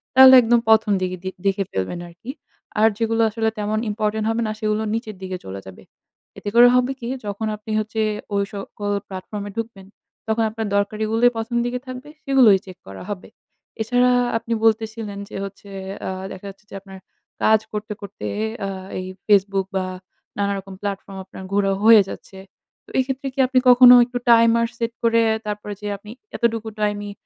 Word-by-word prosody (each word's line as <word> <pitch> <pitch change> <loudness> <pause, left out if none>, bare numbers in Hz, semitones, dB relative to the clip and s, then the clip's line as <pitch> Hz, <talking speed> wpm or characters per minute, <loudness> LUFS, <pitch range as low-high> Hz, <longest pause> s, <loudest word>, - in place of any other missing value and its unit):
তাহলে 260 0 +10
একদম 235 0 +3
১ম 220 -1 +4
দিকে 185 0 -2
দি 190 - -2 0.2
দেখে 195 0 +1
ফেলবেন 95 - -3
আরকি। 175 +9 -9 0.5
আর 220 - +6
যেগুলো 225 0 0
আসলে 225 +1 0
তেমন 210 +1 -1
ইম্পোর্টেন্ট 215 0 -1
হবে 225 +1 0
না - - -2
সেগুলো 215 0 0
নিচের 220 -2 -4
দিকে 185 -1 -4
চলে 95 +1 -6
যাবে। 95 -1 -12 0.5
এতে 205 - -4
করে 240 +1 +9
হবে 250 +1 +2
কি? 235 - -6 0.2
যখন 205 +2 -3
আপনি 210 +1 -9
হচ্ছে 220 +1 -2 0.3
ঐ - - +1 0.2
সকল 205 0 -5
প্লাটফর্ম 200 +2 -6
এ - - -9
ঢুকবেন 225 -4 -6 0.4
তখন 220 +1 +1
আপনার 220 0 -4
দরকারিগুলোই 220 +4 +2
১ম 225 +2 -3
দিকে 245 +1 -2
থাকবে 255 +3 -8
সেগুলোই 255 -7 +5
চেক 185 -1 -11
করা 95 0 -9
হবে। 200 -3 -6 0.5
এছাড়া 245 +3 +3 0.3
আপনি 230 +1 -4
বলতেছিলেন 220 -2 0
যে - - -10
হচ্ছে 200 +1 -9 0.4
আ - - -2 0.2
দেখা 190 - -9
যাচ্ছে 195 +1 -15
যে - - -10
আপনার 195 -1 -12 0.5
কাজ 220 0 +5
করতে, 210 +1 -4
করতে, 200 0 -7 0.4
আ - - -3 0.3
এই 185 - -5 0.2
Facebook 195 -2 +3
বা 190 -1 0 0.5
নানা 200 0 0
রকম 195 0 -11
প্লাটফর্ম 195 -1 -5
আপনার 190 - -11
ঘুরা 200 -1 +2
হয়ে 220 -1 +8
যাচ্ছে। 190 - -10 0.5
তো - - -19
এইক্ষেত্রে 265 +1 -1
কি 275 - -9
আপনি 255 0 +3
কখনো 250 0 +9
একটু 245 0 -5
টাইমার 230 0 +5
সেট 230 0 -2
করে, 230 0 +4 0.2
তারপরে 210 0 -4
যে 210 - -5
আপনি 210 +2 -12 0.2
এতটুকু 225 -2 0
টাইমই 205 -1 -1
215 Hz, 175 wpm, -22 LUFS, 200-230 Hz, 0.5 s, তাহলে